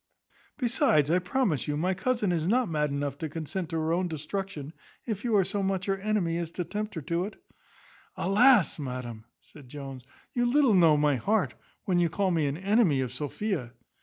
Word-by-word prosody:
Besides, 160 Hz, -, +2 dB
I 180 Hz, -, +4 dB
promise 180 Hz, -, 0 dB
you, 145 Hz, 0 st, -1 dB
my 180 Hz, +5 st, +1 dB
cousin 210 Hz, +1 st, 0 dB
is 165 Hz, -2 st, 0 dB
not 245 Hz, +4 st, +2 dB
mad 150 Hz, -3 st, 0 dB
enough 140 Hz, 0 st, -3 dB
to 160 Hz, -, -3 dB
consent 165 Hz, +3 st, -4 dB
to 165 Hz, -, -4 dB
her 160 Hz, +1 st, 0 dB
own 180 Hz, +1 st, +1 dB
destruction, 160 Hz, -1 st, -5 dB, 0.3 s
if 215 Hz, -4 st, -3 dB
you 235 Hz, -3 st, +1 dB
are 195 Hz, -, +5 dB
so 200 Hz, +3 st, -2 dB
much 190 Hz, -1 st, -1 dB
her 195 Hz, -, +1 dB
enemy 195 Hz, -5 st, 0 dB
as 170 Hz, -2 st, -3 dB
to 180 Hz, -, -2 dB
tempt 210 Hz, +5 st, -5 dB
her 160 Hz, -, -5 dB
to 170 Hz, +5 st, -1 dB
it." 215 Hz, -, -8 dB, 0.8 s
"Alas, 215 Hz, -2 st, +4 dB
madam!" 125 Hz, -5 st, -6 dB, 0.2 s
said 140 Hz, -5 st, -16 dB
Jones, 135 Hz, -2 st, -8 dB, 0.3 s
"you 240 Hz, 0 st, +1 dB
little 265 Hz, -2 st, +4 dB
know 165 Hz, -5 st, +6 dB
my 145 Hz, -2 st, +2 dB
heart, 205 Hz, -, +1 dB, 0.3 s
when 180 Hz, -2 st, +2 dB
you 170 Hz, -1 st, +2 dB
call 190 Hz, +2 st, 0 dB
me 160 Hz, -4 st, +1 dB
an 140 Hz, +2 st, -2 dB
enemy 195 Hz, -, +3 dB
of 125 Hz, -2 st, -3 dB
Sophia." 145 Hz, -, -3 dB
175 Hz, 195 wpm, -28 LUFS, 150-205 Hz, 0.8 s, know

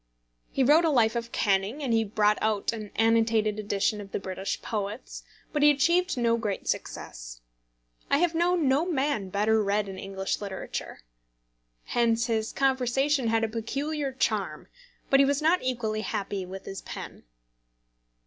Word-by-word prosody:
He 270 Hz, -, +1 dB
wrote 300 Hz, +6 st, +6 dB
a 330 Hz, -, +3 dB
life 235 Hz, -5 st, +3 dB
of 235 Hz, 0 st, -3 dB
Canning, 205 Hz, +7 st, 0 dB
and 250 Hz, -4 st, 0 dB
he 225 Hz, 0 st, +3 dB
brought 210 Hz, 0 st, +2 dB
out 215 Hz, 0 st, 0 dB
an 215 Hz, -2 st, -6 dB
annotated 225 Hz, -1 st, +2 dB
edition 210 Hz, 0 st, 0 dB
of 195 Hz, -1 st, -11 dB
the -, -, -2 dB
British 190 Hz, 0 st, -4 dB
poets; 210 Hz, +1 st, -4 dB, 0.3 s
but 300 Hz, -, 0 dB
he 295 Hz, -, +7 dB
achieved 340 Hz, +4 st, +2 dB
no 235 Hz, -1 st, +2 dB
great 210 Hz, -4 st, -3 dB
success. -, -, -5 dB, 0.7 s
I 280 Hz, -, +4 dB
have 340 Hz, +2 st, +2 dB
known 345 Hz, -2 st, +2 dB
no 270 Hz, +4 st, +3 dB
man 280 Hz, -, -1 dB
better 215 Hz, +3 st, +2 dB
read 205 Hz, +1 st, 0 dB
in 190 Hz, -1 st, -7 dB
English 195 Hz, +1 st, -3 dB
literature. 195 Hz, -2 st, -6 dB, 0.8 s
Hence 230 Hz, -1 st, +1 dB
his 225 Hz, -1 st, -1 dB
conversation 270 Hz, 0 st, +1 dB
had 225 Hz, 0 st, +2 dB
a -, -, +2 dB
peculiar 275 Hz, +6 st, -3 dB
charm, 260 Hz, -, -2 dB, 0.4 s
but 275 Hz, -, +6 dB
he 275 Hz, -, +6 dB
was 280 Hz, 0 st, +1 dB
not 325 Hz, +4 st, +3 dB
equally 230 Hz, -4 st, -1 dB
happy 200 Hz, -3 st, -3 dB
with 190 Hz, +1 st, -8 dB
his 195 Hz, -, -6 dB
pen. -, -, -8 dB
225 Hz, 160 wpm, -27 LUFS, 205-275 Hz, 0.8 s, he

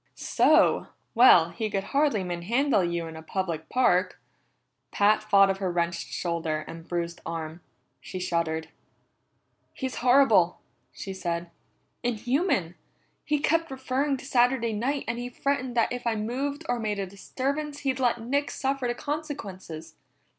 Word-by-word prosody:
"So! -, -, +3 dB, 0.3 s
Well, 180 Hz, -9 st, +7 dB
he 220 Hz, -2 st, -3 dB
could 195 Hz, -2 st, -1 dB
hardly 280 Hz, -8 st, +2 dB
manhandle 195 Hz, +7 st, +1 dB
you 170 Hz, -1 st, -1 dB
in 160 Hz, 0 st, -8 dB
a 160 Hz, -, -8 dB
public 165 Hz, -2 st, -3 dB
park." 185 Hz, -8 st, +2 dB, 0.7 s
Pat 210 Hz, +1 st, +3 dB
thought 195 Hz, -2 st, +5 dB
of 195 Hz, -, -3 dB
her 190 Hz, -2 st, -1 dB
wrenched 170 Hz, 0 st, -1 dB
shoulder 165 Hz, -3 st, -2 dB
and 165 Hz, 0 st, -9 dB
bruised 170 Hz, -1 st, -3 dB
arm. 165 Hz, 0 st, -5 dB, 0.4 s
She 185 Hz, -, -8 dB
shuddered. 165 Hz, -3 st, -1 dB, 1.1 s
"He's 260 Hz, -2 st, -4 dB
horrible!" 240 Hz, -9 st, +5 dB, 0.3 s
she 195 Hz, -, -7 dB
said. 170 Hz, -2 st, -3 dB, 0.5 s
"Inhuman! 245 Hz, -, 0 dB, 0.5 s
He 300 Hz, -, +1 dB
kept 330 Hz, +3 st, +1 dB
referring 265 Hz, +1 st, -1 dB
to 260 Hz, -, -11 dB
Saturday 245 Hz, -3 st, +2 dB
night, 265 Hz, +7 st, -1 dB
and 235 Hz, +1 st, -2 dB
he 245 Hz, 0 st, -4 dB
threatened 255 Hz, -1 st, -2 dB
that 230 Hz, -, +2 dB
if 245 Hz, -1 st, -4 dB
I 230 Hz, -, +1 dB
moved 275 Hz, +8 st, -3 dB
or 245 Hz, -1 st, 0 dB
made 210 Hz, -2 st, -2 dB
a 195 Hz, -, -2 dB
disturbance 280 Hz, +9 st, -4 dB
he'd 265 Hz, -2 st, -1 dB
let 245 Hz, -2 st, +2 dB
Nick 280 Hz, +5 st, -1 dB
suffer 270 Hz, -1 st, -1 dB
the 240 Hz, -, -1 dB
consequences. 195 Hz, -, -6 dB
225 Hz, 145 wpm, -27 LUFS, 175-265 Hz, 1.1 s, Well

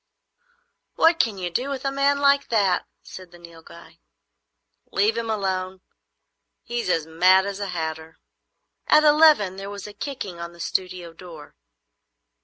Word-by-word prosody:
"What 330 Hz, 0 st, +3 dB
can 220 Hz, -9 st, +1 dB
you 180 Hz, -2 st, -4 dB
do 250 Hz, +10 st, -2 dB
with 275 Hz, -1 st, -5 dB
a 275 Hz, -, 0 dB
man 275 Hz, +1 st, +1 dB
like 280 Hz, 0 st, +3 dB
that?" 200 Hz, -5 st, +1 dB, 0.2 s
said 185 Hz, -1 st, -11 dB
the 175 Hz, -, -16 dB
Nilghai. 170 Hz, -1 st, -15 dB, 0.9 s
"Leave 210 Hz, +3 st, +1 dB
him 230 Hz, -1 st, -3 dB
alone. 190 Hz, -3 st, -3 dB, 0.8 s
He's 235 Hz, -5 st, -4 dB
as 165 Hz, -3 st, +1 dB
mad 185 Hz, +4 st, +4 dB
as 200 Hz, 0 st, -5 dB
a 200 Hz, -, -3 dB
hatter." 160 Hz, -2 st, -5 dB, 0.7 s
At 305 Hz, -, +5 dB
eleven 295 Hz, -11 st, +5 dB
there 195 Hz, +1 st, -7 dB
was 200 Hz, -1 st, -8 dB
a 210 Hz, -, -9 dB
kicking 205 Hz, -6 st, -6 dB
on 170 Hz, 0 st, -7 dB
the 170 Hz, -, -18 dB
studio 180 Hz, -1 st, -4 dB
door. 165 Hz, -3 st, -13 dB
190 Hz, 150 wpm, -23 LUFS, 175-235 Hz, 0.9 s, At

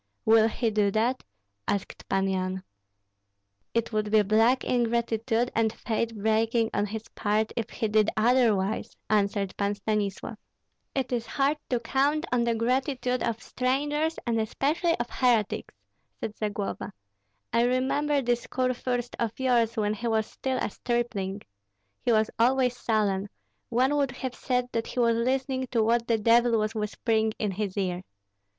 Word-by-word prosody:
"Will 220 Hz, 0 st, +6 dB
he 225 Hz, 0 st, -1 dB
do 210 Hz, -1 st, +2 dB
that?" 230 Hz, +5 st, 0 dB, 0.5 s
asked 200 Hz, -, -3 dB
Pan 195 Hz, 0 st, +1 dB
Yan. 185 Hz, 0 st, -2 dB, 1.1 s
"It 230 Hz, 0 st, 0 dB
would 215 Hz, -1 st, 0 dB
be 215 Hz, 0 st, +5 dB
black 225 Hz, +5 st, +3 dB
ingratitude 235 Hz, 0 st, 0 dB
and 225 Hz, -1 st, +2 dB
faith 225 Hz, 0 st, -2 dB
breaking 220 Hz, +2 st, +1 dB
on 205 Hz, +1 st, 0 dB
his 220 Hz, +2 st, -6 dB
part 215 Hz, +1 st, 0 dB
if 230 Hz, -2 st, -2 dB
he 225 Hz, -, -2 dB
did 215 Hz, 0 st, +3 dB
otherwise," 220 Hz, -3 st, +2 dB
answered 200 Hz, -2 st, +1 dB
Pan 200 Hz, 0 st, 0 dB
Stanislav. 210 Hz, +1 st, -2 dB, 0.6 s
"It 265 Hz, -2 st, -1 dB
is 235 Hz, -2 st, -1 dB
hard 280 Hz, +2 st, +1 dB
to 245 Hz, -, +1 dB
count 285 Hz, +6 st, +1 dB
on 245 Hz, -1 st, +2 dB
the 235 Hz, -1 st, +1 dB
gratitude 250 Hz, +1 st, 0 dB
of 230 Hz, -1 st, -2 dB
strangers, 295 Hz, +5 st, 0 dB
and 230 Hz, -2 st, +1 dB
especially 305 Hz, -, 0 dB
of 240 Hz, -, -1 dB
heretics," 235 Hz, -5 st, +1 dB, 0.4 s
said 215 Hz, -, -4 dB
Zagloba. 205 Hz, -2 st, -3 dB, 0.6 s
"I 230 Hz, -, +4 dB
remember 270 Hz, +4 st, +1 dB
this 240 Hz, 0 st, 0 dB
kurfürst 250 Hz, -1 st, -1 dB
of 230 Hz, 0 st, -2 dB
yours 240 Hz, -3 st, +2 dB
when 210 Hz, -1 st, +1 dB
he 235 Hz, +3 st, -4 dB
was 220 Hz, -1 st, +1 dB
still 260 Hz, +3 st, -3 dB
a 220 Hz, -, -2 dB
stripling. 225 Hz, -6 st, -2 dB, 0.6 s
He 240 Hz, -, +1 dB
was 220 Hz, -1 st, +3 dB
always 250 Hz, +1 st, +3 dB
sullen; 210 Hz, -4 st, 0 dB, 0.4 s
one 255 Hz, +4 st, +2 dB
would 280 Hz, -2 st, +2 dB
have 255 Hz, 0 st, -5 dB
said 250 Hz, -1 st, -1 dB
that 230 Hz, -1 st, -2 dB
he -, -, -4 dB
was 230 Hz, -1 st, +4 dB
listening 260 Hz, +2 st, 0 dB
to 230 Hz, -2 st, +1 dB
what 230 Hz, +1 st, +2 dB
the 230 Hz, -, +3 dB
devil 230 Hz, +2 st, +4 dB
was 215 Hz, 0 st, 0 dB
whispering 220 Hz, 0 st, 0 dB
in 210 Hz, -2 st, -1 dB
his 200 Hz, 0 st, -3 dB
ear. 180 Hz, -2 st, -1 dB
230 Hz, 155 wpm, -27 LUFS, 215-250 Hz, 1.1 s, Will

